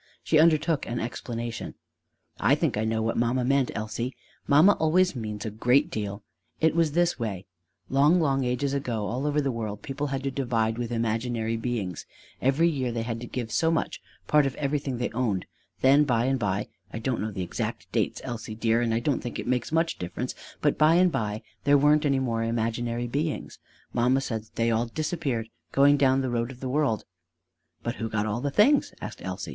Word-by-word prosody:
She 155 - +3
undertook 155 -1 +3
an 120 0 -2
explanation: 115 0 -5 0.6
"I - - +4
think - - 0
I 110 +1 0
know 110 0 0
what 115 - -1
mamma 120 +2 +1
meant, 135 0 +2
Elsie. 110 +4 -3 0.3
Mamma 155 +8 +7
always 180 +2 +3
means 105 -3 -5
a 110 - -3
great 125 +9 +2
deal. 100 -3 -4 0.4
It 160 0 +3
was 165 -3 +2
this 175 -2 +2
way: 100 -5 -3 0.4
long, 145 +6 +4
long 135 -4 +2
ages 125 +3 0
ago 120 -6 -2
all 125 +7 -2
over 150 0 +1
the 140 -2 0
world 110 -3 -5
people 145 +1 -3
had 135 -1 -3
to 135 - -1
divide 115 -4 0
with 120 -1 -3
imaginary 115 0 -1
beings: 115 -6 -3 0.3
every 135 +6 +3
year 135 -7 -1
they 115 -1 -2
had 115 -1 -3
to 120 - -6
give 120 -3 -4
so 160 +9 +2
much, 165 - -1 0.2
part 150 -2 +4
of 135 - -4
everything 140 -2 -2
they 120 - -2
owned. 115 -6 -1 0.4
Then 140 +3 +6
by 120 -4 +1
and 135 0 +1
by 100 -1 -1 0.2
I - - -5
don't 115 +2 -1
know 110 - -2
the 95 -3 -4
exact 90 - -4
date, - - 0
Elsie, 115 -2 -5
dear, 115 +1 +2
and 115 -2 +1
I - - +2
don't 140 +2 0
think 120 - -5
it - - -4
makes 125 +1 -1
much 165 +1 +1
difference; 90 +8 -4 0.3
but 145 - +1
by 155 +2 +6
and 180 0 +5
by 110 -4 -2 0.2
there 145 0 +5
weren't 150 +1 +4
any 140 -1 +2
more 120 -4 -1
imaginary 115 +1 -1
beings. 145 +6 -3 0.3
Mamma 125 +3 +3
said 115 -4 -3
that - - -27
they 115 0 +1
all 115 +2 +1
disappeared, 135 -5 -2 0.2
going 140 +1 +5
down 135 -1 +3
the 130 -2 -2
road 120 0 -1
of 130 -2 -10
the 130 - -4
world." 135 -6 +1 0.8
"But 120 +1 -3
who 115 - -3
got 110 -1 -1
all 110 +2 -2
the 145 - 0
things?" 240 - +3
asked - - -7
Elsie. - - -5
125 Hz, 205 wpm, -27 LUFS, 115-145 Hz, 0.8 s, Mamma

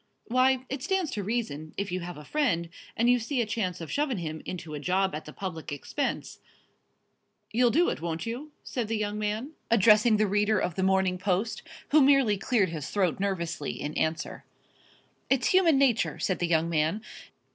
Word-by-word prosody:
"Why, 255 +1 +2
it 270 0 -4
stands 380 -1 0
to 210 - -3
reason, 155 -9 -3
if 200 -2 -2
you 185 - -1
have 175 -1 -7
a 150 - -10
friend, 195 - 0 0.3
and 235 +1 +3
you 245 0 +5
see 250 +4 -2
a 235 - +2
chance 195 -5 -2
of 165 -3 -7
shovin' 285 -5 0
him 155 -3 -5
into 170 -4 -6
a 150 - -4
job 190 +5 +1
at 155 - -5
the 150 - -9
public 170 -4 -6
expense, 270 - -3 1.1
you'll 240 +2 +4
do 335 +9 +3
it, - - -4
won't 165 -1 -3
you?" 250 +7 -5
said 240 -4 -3
the 225 0 -1
young 210 0 -2
man, 215 +7 -2 0.2
addressing 215 0 +5
the 215 - +3
reader 210 +2 +2
of 180 - -1
The 190 - -3
Morning 190 -1 +2
Post, 195 +4 -1 0.3
who 305 +1 +6
merely 270 -6 +5
cleared 200 -1 +1
his 155 -3 -5
throat 185 -5 0
nervously 170 -7 -2
in 150 - -4
answer. 160 +2 -2 0.9
"It's 265 -2 +2
human 350 -6 +5
nature," 265 -4 +2
said 185 - -1
the 175 - 0
young 165 -1 +2
man. 165 +6 0
205 Hz, 190 wpm, -28 LUFS, 170-245 Hz, 1.1 s, who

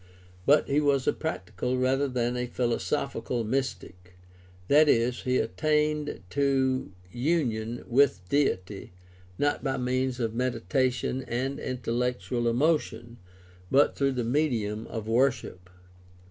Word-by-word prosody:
But 145 +2 +5
he 145 +2 +2
was 140 -3 +2
a - - +2
practical 125 +1 -3
rather 135 +2 +1
than 125 -2 -1
a 125 0 -2
philosophical 120 0 -2
mystic, 100 -7 -4 0.5
that 150 +4 +5
is, 120 0 +2
he 130 0 +1
attained 150 - 0
to 130 -4 +1 0.2
union 120 - -1
with 120 -8 +2
Deity, 100 -10 -1 0.4
not 145 0 0
by 135 -1 -1
means 130 0 -1
of 115 -2 -1
meditation 125 +2 -1
and 130 +4 -2
intellectual 125 -2 -2
emotion, 120 -3 0 0.5
but 140 +2 +4
through 135 -1 +1
the 125 -2 -2
medium 115 -5 -1
of 110 -2 -6
worship. 115 -7 0
125 Hz, 120 wpm, -27 LUFS, 115-140 Hz, 0.5 s, But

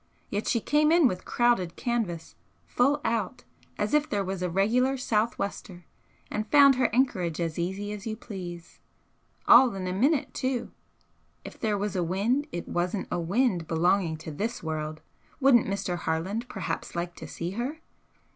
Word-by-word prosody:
Yet 205 +1 -2
she 235 - +2
came 300 +6 +2
in 335 -4 +6
with 180 -5 -4
crowded 240 -8 +1
canvas 215 -9 -2 0.3
full 280 - +2
out 225 -1 -1 0.3
as - - -1
if 300 0 +3
there 205 -8 0
was 190 -1 -4
a 180 - 0
regular 240 +9 +2
sou'wester, 210 -5 -2 0.5
and 215 0 -3
found 280 -2 +7
her 255 -1 +2
anchorage 190 - +1
as 165 -1 -2
easy 190 +4 -3
as 210 +1 -6
you 215 - -2
please. 180 -6 -9 0.7
All 255 -6 +7
in 190 -1 -4
a 180 - -2
minute, 270 - +1
too. 255 -2 -2 0.7
If - - -10
there 215 -2 0
was 205 0 -3
a 180 - +1
wind 215 - 0
it 175 - -5
wasn't 180 +3 -2
a - - 0
wind 180 -1 +1
belonging 170 0 +1
to 160 - -5
this 210 +9 -4
world! 155 -1 -4 0.4
Wouldn't 265 -4 +5
Mr. 195 -3 -2
Harland 185 +10 -2
perhaps 190 -3 -4
like 170 0 -3
to - - -8
see 170 +1 -5
her?" 245 +9 -3
200 Hz, 165 wpm, -27 LUFS, 175-245 Hz, 0.7 s, found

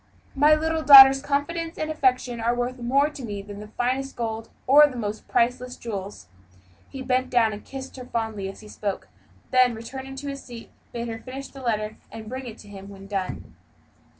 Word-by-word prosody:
My 295 +3 +5
little 320 +1 -1
daughter's 270 -2 +10
confidence 325 +4 -2
and 310 0 -2
affection 255 -5 0
are 235 +2 0
worth 245 +1 -3
more 270 +4 +2
to 275 - -9
me 205 -3 -5
than 205 0 -9
the 210 - -9
finest 255 +4 -2
gold, 225 -1 -4 0.2
or 290 +3 +7
the 255 -4 -8
most 215 -2 -5
priceless 250 +1 0
jewels." 200 - -7 0.6
He 270 -1 -7
bent 255 0 0
down 230 -3 +3
and 205 - -9
kissed 270 0 -9
her 250 - -8
fondly 220 -5 -3
as 195 - -11
he 215 - -13
spoke; 205 -2 -5 0.4
then, 255 -2 +4
returning 265 +4 -8
to 280 +2 -7
his 275 0 -6
seat, 235 -2 -11 0.2
bade 235 0 -4
her 225 -1 -5
finish 265 +3 -9
her 270 - -10
letter 215 -3 -2
and 220 -1 -9
bring 260 +1 -6
it 230 -1 -9
to 205 - -15
him 195 -1 -11
when 195 -1 -12
done. 195 -2 -5
245 Hz, 200 wpm, -24 LUFS, 220-270 Hz, 0.6 s, daughter's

